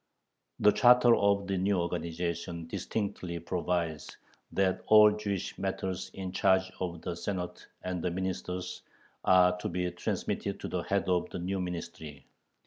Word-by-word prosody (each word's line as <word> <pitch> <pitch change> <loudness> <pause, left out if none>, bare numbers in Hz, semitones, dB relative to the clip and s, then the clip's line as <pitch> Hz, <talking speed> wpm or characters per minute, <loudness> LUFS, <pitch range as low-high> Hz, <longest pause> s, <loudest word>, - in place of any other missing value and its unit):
The 105 - +7
charter 120 0 +6
of 100 -1 +2
the 95 -1 -1
new 100 +1 +2
organization 85 0 -3
distinctly 95 0 -3
provides 85 -2 -2 0.3
that 95 -1 +1
all 105 -1 +8
"Jewish 105 -3 -3
matters 95 -1 -3
in 95 -1 -5
charge 95 0 +2
of 85 -3 -4
the 90 - -2
Senate 90 -1 -4 0.2
and 90 -1 -3
the - - +1
Ministers" 90 0 -4 0.4
are 90 -1 +5
to - - -3
be 90 0 -1
transmitted 85 - -3
to - - -4
the - - -2
head - - -1
of 90 -1 +1
the - - -5
new 95 +2 -2
Ministry. 80 -4 -6
90 Hz, 145 wpm, -30 LUFS, 85-95 Hz, 0.4 s, all